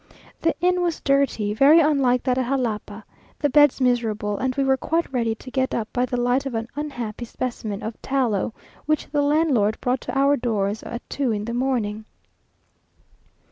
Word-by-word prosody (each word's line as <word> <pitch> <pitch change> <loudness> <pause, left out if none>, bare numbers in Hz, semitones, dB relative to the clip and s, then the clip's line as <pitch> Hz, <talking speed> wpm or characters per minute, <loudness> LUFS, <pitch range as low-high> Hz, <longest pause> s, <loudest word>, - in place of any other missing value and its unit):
The 330 - +1
inn 360 0 +2
was 345 -2 -1
dirty, 275 -7 +1
very 280 +8 +6
unlike 275 -6 +2
that 255 -2 +1
at 255 - -1
Jalapa, 220 -5 -2 0.3
the 290 - 0
beds 290 -1 +5
miserable, 225 -5 0
and 260 -1 -1
we 275 - +1
were 265 0 +3
quite 325 +2 -2
ready 230 -3 0
to 255 +3 -12
get 260 0 0
up 225 -2 -2
by 250 0 +1
the 245 - -2
light 250 +3 +1
of 255 - -5
an 225 0 -2
unhappy 245 -6 -5
specimen 225 -4 -5
of 220 +1 -6
tallow 245 -7 0 0.4
which 305 -1 0
the 290 -1 +1
landlord 285 -8 +2
brought 250 0 -1
to - - -4
our 280 +1 +4
doors 215 -4 -1
at 235 +1 -7
two 275 -4 -1
in 210 -1 -2
the 235 - -4
morning. 235 -4 -1
250 Hz, 180 wpm, -23 LUFS, 225-275 Hz, 0.4 s, very